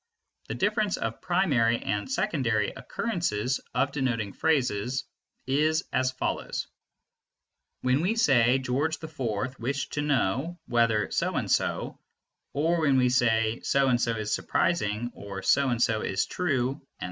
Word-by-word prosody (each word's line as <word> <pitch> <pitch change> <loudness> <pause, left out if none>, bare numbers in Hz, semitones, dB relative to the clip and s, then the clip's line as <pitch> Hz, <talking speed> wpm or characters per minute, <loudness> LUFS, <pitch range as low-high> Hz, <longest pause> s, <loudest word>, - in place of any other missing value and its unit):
The - - -4
difference 205 0 +1
of - - -4
primary 140 -11 +2
and 105 +1 -3
secondary 130 - 0
occurrences 135 - -2
of 140 - +2
denoting 120 -8 -1
phrases 125 -4 0 0.4
is 155 +5 +2
as 130 0 +2
follows: 130 - -3 1.2
When 130 +3 +2
we 190 +7 +1
say: 130 - +4
"George 135 +5 0
IV 130 -5 -3
wished 135 +4 -3
to 145 - 0
know 145 - 0
whether 115 -3 +2
so - - 0
and - - -1
so," - - 0 0.5
or 165 +4 +1
when 140 -4 +3
we 125 -1 +4
say 115 -2 +2
"So 135 -1 +2
and 120 -1 +2
so 115 - +1
is 110 -1 -2
surprising" 120 -8 0
or 100 -1 -7
"So 140 -1 +3
and 120 -2 0
so 115 -2 +2
is 95 - 0
true," 130 -8 0
etc. 135 - -35
130 Hz, 145 wpm, -27 LUFS, 115-155 Hz, 1.2 s, say